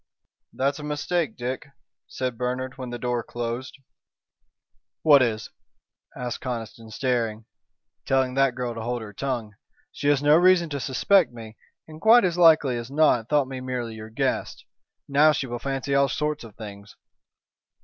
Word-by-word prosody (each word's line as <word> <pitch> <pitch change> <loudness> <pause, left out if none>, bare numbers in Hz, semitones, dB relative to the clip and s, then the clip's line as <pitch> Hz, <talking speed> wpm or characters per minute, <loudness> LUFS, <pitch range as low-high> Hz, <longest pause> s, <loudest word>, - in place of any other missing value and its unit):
"That's 140 +2 -1
a - - -7
mistake, 150 -1 -2
Dick," 130 +3 -4 0.4
said 130 -2 -3
Bernard, 125 +2 -3
when 130 -2 -7
the 120 - -5
door 120 0 -1
closed. 120 +3 -5 1.3
"What 145 -3 +7
is?" 110 -3 -1 0.7
asked 125 -1 -4
Conniston, 115 -2 -6
staring. 115 -2 -1 0.6
"Telling 130 -1 +2
that 135 -1 +2
girl 125 -2 -3
to 115 - -6
hold 120 0 -3
her 105 -2 -10
tongue. 120 -3 -3 0.4
She 145 - -4
has 145 -1 +3
no 145 +1 +6
reason 175 -2 +4
to 140 - -2
suspect 155 +8 +3
me, 115 -2 -10 0.3
and 155 0 -12
quite 225 -1 +6
as 175 -2 0
likely 155 -7 +5
as 120 +1 -6
not 140 -6 +2
thought 145 -3 +2
me 130 -1 -6
merely 125 -3 -4
your 110 0 -9
guest. 110 - -2 0.4
Now 150 +2 +5
she 140 -1 -2
will 120 -1 -5
fancy 135 +1 -3
all 140 0 +3
sorts 150 -2 -2
of 110 -3 -12
things." 100 -1 -10
130 Hz, 160 wpm, -25 LUFS, 120-145 Hz, 1.3 s, What